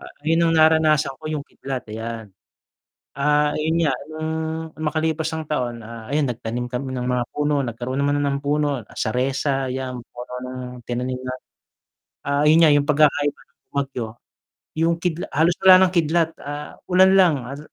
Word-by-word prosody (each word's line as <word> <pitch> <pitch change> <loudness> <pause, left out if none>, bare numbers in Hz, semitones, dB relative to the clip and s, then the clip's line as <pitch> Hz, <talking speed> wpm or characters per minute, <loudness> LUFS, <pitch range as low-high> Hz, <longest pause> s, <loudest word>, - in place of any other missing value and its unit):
Ayan 165 +3 -1
yung 165 - +2
naranasan 155 -3 +4
ko - - -17
yung 150 -2 -3
kidlat, 135 -3 -6
ayan. 110 -2 -6 0.8
Ah, 150 +1 +3
ayun 160 +2 0
nga 145 -4 +2 0.2
nung 155 0 -4 0.5
makalipas 160 +1 -1
ang 160 -1 -5
taon, 125 -5 -2
ah, 115 0 -9
ayun 145 -3 +2
nagtanim 120 +1 -4
kami 130 +1 -4
ng 125 -1 -2
mga 125 -1 +1
puno, 145 -1 0
nagkaroon 120 +3 -4
naman 145 +1 +1
ng 140 -1 0
puno, 145 -4 0
saresa 135 +3 0
'yan, 130 -1 -4
puno 125 +1 -10
ng 130 0 -6 0.3
tinanim 125 +1 -2
na, 130 0 -3 0.9
ah, 140 0 +1
ayun 155 +2 +6
nga 155 - +7
yung 145 0 +4
pagkakaiba 145 -1 +2
ng - - -42
bumagyo, 135 -4 -2 0.7
yung 165 +1 +2
kidla 170 0 -3
halos 165 +4 +2
wala 190 0 +8
ng - - -5
kidlat, 165 0 +2
ah, 145 +1 -6 0.2
ulan 190 +1 +6
lang. 185 -4 +6
Hal 140 +3 -7
145 Hz, 165 wpm, -22 LUFS, 130-155 Hz, 0.9 s, wala